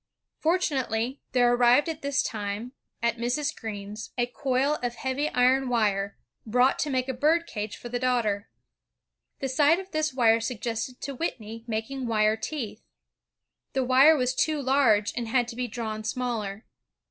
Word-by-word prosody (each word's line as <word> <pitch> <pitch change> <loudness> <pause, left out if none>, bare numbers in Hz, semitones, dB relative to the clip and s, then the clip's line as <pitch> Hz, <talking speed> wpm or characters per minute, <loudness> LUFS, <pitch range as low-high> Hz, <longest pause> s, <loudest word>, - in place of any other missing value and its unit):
Fortu 345 +1 +2
nately, 250 0 -1
there 245 -1 +4
arrived 245 +4 +5
at 325 -1 -4
this 280 0 +1
time, 210 +2 -4 0.3
at 235 0 +1
Mrs. 280 +6 -1
Greene's, 210 -1 -6
a 240 - +2
coil 265 +3 0
of 240 -1 -2
heavy 270 +4 -1
iron 255 +1 +3
wire, 200 -4 0 0.3
brought 250 +4 +2
to 300 - 0
make 255 -1 0
a 265 - -1
bird 315 +6 +2
cage 210 -5 -5
for - - -9
the 245 +1 -3
daughter. 230 -5 0 0.9
The 270 - 0
sight 290 +5 +4
of 385 0 -9
this 310 0 0
wire 230 -3 +4
suggested 230 +1 -4
to 280 - -4
Whitney 230 -6 -5
making 235 +4 -3
wire 215 -1 +3
teeth. 225 -2 -5 0.9
The 265 - +1
wire 265 +5 +6
was 255 -1 +1
too 305 +3 +1
large 260 -7 +3
and 240 -1 -3
had 240 +1 +2
to 235 - -7
be 250 0 -2
drawn 220 -1 -4
smaller. 220 -3 -3
245 Hz, 165 wpm, -27 LUFS, 225-270 Hz, 0.9 s, wire